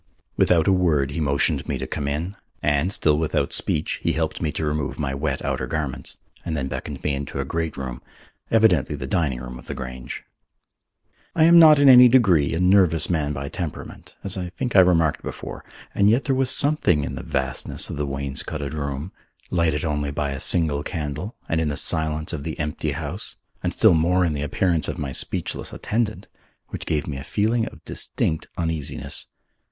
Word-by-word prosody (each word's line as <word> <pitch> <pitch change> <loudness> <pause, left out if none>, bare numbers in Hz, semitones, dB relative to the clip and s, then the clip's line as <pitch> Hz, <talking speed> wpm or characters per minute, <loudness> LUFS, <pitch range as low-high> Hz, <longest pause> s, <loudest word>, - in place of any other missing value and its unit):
Without 80 -3 +3
a - - +5
word 75 -7 +2
he 70 - -4
motioned 70 -3 +1
me - - -1
to - - -4
come 70 - -4
in, 80 +7 -3 0.3
and, 75 +5 +2
still 75 -6 +3
without 80 -1 0
speech, 75 - 0
he - - 0
helped - - -2
me 75 - 0
to 80 - -3
remove 75 -2 -2
my 70 -3 -2
wet 70 0 -2
outer - - -2
garments, 75 -5 -4 0.3
and 80 - -3
then 65 -2 -2
beckoned - - -6
me 75 - 0
into 70 0 -4
a - - -1
great 80 -2 -3
room, 65 -2 -5 0.5
evidently 105 -11 +3
the 70 -2 -5
dining 70 -3 0
room 60 0 -8
of - - -15
the - - -5
Grange. 65 -1 -7 1.1
I 160 - +4
am 170 +1 +8
not 155 -2 +8
in 140 0 +5
any 125 -1 +10
degree 95 - +4
a - - -1
nervous 90 -3 +4
man 75 -4 0
by 70 -1 -4
temperament, 85 +1 -7
as 100 0 -4
I 90 -1 -4
think 120 +6 -4
I - - +9
remarked 85 -4 +3
before, - - -7 0.3
and 100 +1 +4
yet 120 +5 +3
there 135 - 0
was 130 -1 +1
something 125 - +4
in 65 - -4
the 65 - -5
vastness 65 -1 -2
of - - -5
the 75 0 -2
wainscoted 70 +1 -4
room, 70 +3 -4 0.4
lighted 85 -2 +1
only 75 -2 -1
by 70 -1 -2
a 70 - -4
single 80 -4 +1
candle, 75 - -5
and 80 0 0
in 80 - 0
the 70 -1 -2
silence 80 +1 0
of 75 -4 -4
the 80 0 -5
empty 75 0 -2
house, 80 +6 -6 0.3
and - - -1
still - - +5
more 90 +3 +3
in 80 - 0
the 70 - -3
appearance 80 +3 0
of - - -4
my 70 -2 -4
speechless - - -2
attendant, 110 -1 -2 0.4
which - - -6
gave 75 -1 0
me 70 -3 -5
a 70 - -7
feeling 110 +6 0
of - - -12
distinct 80 - -2
uneasiness. 80 -4 -2
80 Hz, 200 wpm, -23 LUFS, 70-90 Hz, 1.1 s, any